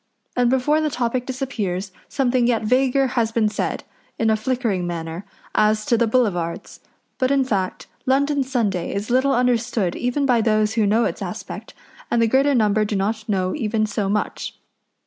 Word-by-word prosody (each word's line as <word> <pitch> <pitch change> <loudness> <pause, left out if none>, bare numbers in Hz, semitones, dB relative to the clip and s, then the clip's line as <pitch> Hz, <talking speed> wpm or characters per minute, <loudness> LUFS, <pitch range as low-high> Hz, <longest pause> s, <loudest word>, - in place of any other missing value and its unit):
and 245 -1 +3
before 265 +5 +2
the 310 - +1
topic 245 -1 -2
disappears 210 -8 -3 0.2
something 255 -3 +1
yet 230 -3 +1
vaguer 260 +4 +3
has 235 -3 0
been 225 -1 +2
said, 210 - -2 0.3
in 225 -1 +2
a - - +4
flickering 215 -5 -1
manner, 165 +1 -5 0.3
as 215 0 +2
to 235 - +3
the 235 0 +2
Boulevards. 200 -9 -1 0.4
But 255 -1 +2
in 275 -1 +3
fact 195 -7 -2 0.2
London 280 +2 +2
Sunday 220 -11 -1
is 205 +4 -3
little 265 +2 +3
understood 235 -6 +1
even 250 +3 0
by 245 -4 +3
those 215 -1 +2
who 220 -3 +2
know 225 +3 +3
its - - -3
aspect, - - -7 0.3
and 235 - +1
the 230 - +4
greater 270 +4 +3
number 215 -2 +3
do 210 0 -2
not 215 +3 -2
know 185 -2 0
even 220 -5 0
so 210 -2 -2
much. 210 +1 -2
230 Hz, 175 wpm, -22 LUFS, 210-255 Hz, 0.4 s, a